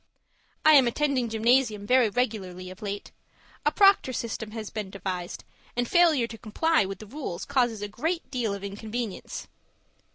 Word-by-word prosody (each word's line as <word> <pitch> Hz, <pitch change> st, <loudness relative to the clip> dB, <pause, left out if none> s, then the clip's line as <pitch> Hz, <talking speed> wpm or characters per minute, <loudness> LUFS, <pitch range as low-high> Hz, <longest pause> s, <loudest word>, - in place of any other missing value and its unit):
I 310 Hz, -, +9 dB
am 270 Hz, -4 st, +7 dB
attending 260 Hz, -1 st, 0 dB
gymnasium 225 Hz, -1 st, +2 dB
very 250 Hz, 0 st, +4 dB
regularly 190 Hz, -6 st, -2 dB
of 185 Hz, -, -13 dB
late. 205 Hz, -1 st, -5 dB, 0.6 s
A -, -, +4 dB
proctor 395 Hz, -10 st, +5 dB
system 225 Hz, -2 st, -4 dB
has 215 Hz, -1 st, -6 dB
been 210 Hz, -3 st, -4 dB
devised, 185 Hz, -2 st, -5 dB, 0.3 s
and 245 Hz, 0 st, +1 dB
failure 325 Hz, -7 st, +4 dB
to 225 Hz, -1 st, -9 dB
comply 315 Hz, +4 st, +2 dB
with 195 Hz, 0 st, -5 dB
the 215 Hz, -, -10 dB
rules 210 Hz, -, -5 dB
causes 245 Hz, -6 st, +1 dB
a -, -, -2 dB
great 325 Hz, -, -3 dB
deal 235 Hz, -6 st, -1 dB
of 200 Hz, -, -9 dB
inconvenience. 215 Hz, +2 st, -5 dB
225 Hz, 160 wpm, -27 LUFS, 205-260 Hz, 0.6 s, I